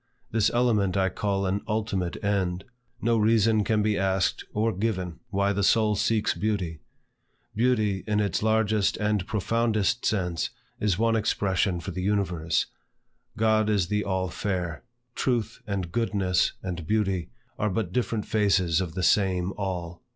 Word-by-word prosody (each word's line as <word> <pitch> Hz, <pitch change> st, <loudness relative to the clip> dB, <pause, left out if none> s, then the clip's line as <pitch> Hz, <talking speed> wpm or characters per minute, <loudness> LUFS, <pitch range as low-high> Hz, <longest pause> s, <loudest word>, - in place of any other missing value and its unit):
This 110 Hz, -1 st, +3 dB
element 110 Hz, -6 st, +2 dB
I 95 Hz, -1 st, +2 dB
call 100 Hz, 0 st, -1 dB
an 95 Hz, +2 st, 0 dB
ultimate 105 Hz, -5 st, -2 dB
end. 95 Hz, -3 st, 0 dB, 0.4 s
No 115 Hz, 0 st, +3 dB
reason 110 Hz, 0 st, +3 dB
can 105 Hz, +1 st, +1 dB
be 105 Hz, -1 st, +1 dB
asked 95 Hz, -1 st, +1 dB
or 110 Hz, +1 st, 0 dB
given 95 Hz, -4 st, -2 dB
why 100 Hz, 0 st, +1 dB
the 100 Hz, -, -1 dB
soul 110 Hz, +1 st, +3 dB
seeks 110 Hz, +2 st, +1 dB
beauty. 95 Hz, -7 st, -2 dB, 0.8 s
Beauty, 110 Hz, -4 st, +1 dB
in 105 Hz, -1 st, +1 dB
its 100 Hz, -4 st, 0 dB
largest 110 Hz, -2 st, +2 dB
and 105 Hz, -3 st, 0 dB
profoundest 115 Hz, +2 st, 0 dB
sense, 90 Hz, -6 st, 0 dB, 0.3 s
is 100 Hz, -4 st, +1 dB
one 115 Hz, +1 st, +2 dB
expression 100 Hz, -4 st, +1 dB
for 80 Hz, -, -6 dB
the 90 Hz, -, -4 dB
universe. 90 Hz, -5 st, 0 dB, 0.7 s
God 110 Hz, -1 st, +3 dB
is 100 Hz, -5 st, +1 dB
the 105 Hz, 0 st, 0 dB
all 95 Hz, -1 st, -1 dB
fair. 90 Hz, -3 st, -3 dB, 0.3 s
Truth, 115 Hz, -4 st, -1 dB
and 95 Hz, -4 st, -3 dB
goodness, 100 Hz, -6 st, +1 dB
and 85 Hz, -4 st, -5 dB
beauty, 95 Hz, -, 0 dB, 0.3 s
are 105 Hz, 0 st, +1 dB
but 95 Hz, -2 st, -2 dB
different 115 Hz, -2 st, -1 dB
faces 95 Hz, -5 st, +2 dB
of 90 Hz, -2 st, -5 dB
the 95 Hz, -, -2 dB
same 95 Hz, -2 st, +2 dB
All. 90 Hz, -3 st, -4 dB
100 Hz, 150 wpm, -26 LUFS, 95-110 Hz, 0.8 s, This